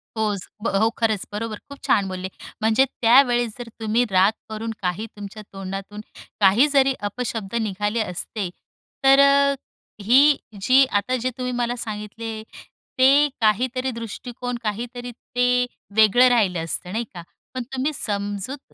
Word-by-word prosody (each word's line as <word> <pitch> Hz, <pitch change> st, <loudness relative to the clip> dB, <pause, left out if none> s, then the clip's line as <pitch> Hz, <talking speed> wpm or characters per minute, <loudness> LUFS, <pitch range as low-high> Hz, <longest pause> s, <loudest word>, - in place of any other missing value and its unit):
होच 210 Hz, -4 st, -2 dB, 0.2 s
ब -, -, 0 dB
हो, 225 Hz, -, +4 dB
खरंच 220 Hz, -4 st, 0 dB
बरोबर 215 Hz, +1 st, -4 dB
खूप 280 Hz, -1 st, -10 dB
छान 200 Hz, -2 st, +3 dB
बोलले, 185 Hz, 0 st, -5 dB, 0.3 s
म्हणजे 225 Hz, +5 st, +4 dB
त्यावेळेस 240 Hz, -1 st, +3 dB
जर 245 Hz, -1 st, -7 dB
तुम्ही 225 Hz, +2 st, +1 dB
राग 190 Hz, +3 st, +5 dB, 0.2 s
करून 220 Hz, +1 st, -4 dB
काही 180 Hz, +4 st, -2 dB
तुमच्या 205 Hz, +1 st, -9 dB
तोंडातून 195 Hz, +2 st, -6 dB, 0.4 s
काही 210 Hz, +8 st, +5 dB
जरी 270 Hz, -1 st, +4 dB, 0.2 s
अपशब्द 225 Hz, -2 st, -4 dB
निघाले 210 Hz, +2 st, -1 dB
असते 185 Hz, 0 st, -4 dB, 0.5 s
तर 270 Hz, 0 st, +6 dB
अ, 280 Hz, 0 st, +5 dB, 0.5 s
ही 270 Hz, +7 st, +5 dB, 0.2 s
जी 260 Hz, +5 st, +5 dB
आता 220 Hz, +1 st, 0 dB
जे 255 Hz, -, 0 dB
तुम्ही 250 Hz, 0 st, -3 dB
मला 240 Hz, 0 st, -1 dB
सांगितले 220 Hz, 0 st, -6 dB, 0.6 s
ते 275 Hz, +3 st, +6 dB
काहीतरी 255 Hz, +4 st, +1 dB
दृष्टिकोन 245 Hz, +2 st, -6 dB
काहीतरी 245 Hz, +3 st, -4 dB
ते 250 Hz, +1 st, 0 dB, 0.3 s
वेगळं 220 Hz, +3 st, +6 dB
राहिलं 195 Hz, -9 st, +2 dB
असतं, 180 Hz, +2 st, -4 dB
नाही 225 Hz, +4 st, -1 dB
का? 175 Hz, -, -7 dB, 0.3 s
पण 255 Hz, -1 st, -3 dB
तुम्ही 265 Hz, +3 st, 0 dB
समजूत 205 Hz, +4 st, -4 dB
225 Hz, 140 wpm, -23 LUFS, 205-250 Hz, 0.6 s, तर